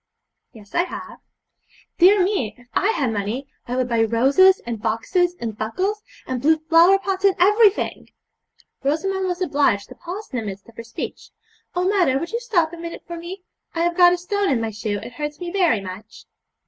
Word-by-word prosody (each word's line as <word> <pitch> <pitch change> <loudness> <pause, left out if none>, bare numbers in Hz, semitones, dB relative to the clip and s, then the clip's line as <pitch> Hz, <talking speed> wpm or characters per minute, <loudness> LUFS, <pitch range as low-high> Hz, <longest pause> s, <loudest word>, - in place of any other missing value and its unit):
'Yes, 210 -3 -16
I 345 - +2
have.' - - -9 0.8
'Dear 375 +2 +6
me! 360 - -1
if 245 0 -20
I 390 - +2
had 270 - 0
money 215 +7 -3 0.2
I 245 - -3
would 255 -1 0
buy 230 -2 +1
roses, 270 - +4
and 235 -3 -5
boxes, 350 - 0
and 225 -3 -4
buckles, 370 - -2 0.2
and 255 -2 -3
blue 315 +3 +4
flower 330 +4 +5
pots, 390 -1 -3
and 395 -2 +4
everything.' 415 +3 +3 0.7
Rosamond 375 +7 -1
was 360 0 -3
obliged 285 - +1
to - - -9
pause 385 +5 -7
in 250 - -2
the 220 - -6
midst 195 0 -8
of 230 - -17
her 230 - -8
speech. 230 0 -7 0.5
'Oh, 360 +1 +1
mother, 365 -10 +3
would 335 +4 -4
you 465 - -1
stop 355 -10 0
a - - -7
minute 335 0 -7
for 340 - -7
me? 355 +3 -8 0.3
I 330 - 0
have 345 0 +1
got 355 -1 +7
a 360 - +1
stone 395 +3 -1
in 255 - +2
my 225 -1 -2
shoe; 210 0 -3
it 245 - -9
hurts 295 +3 -5
me 350 -1 -5
very 345 - +2
much.' 195 +3 -10
330 Hz, 200 wpm, -22 LUFS, 230-375 Hz, 0.8 s, got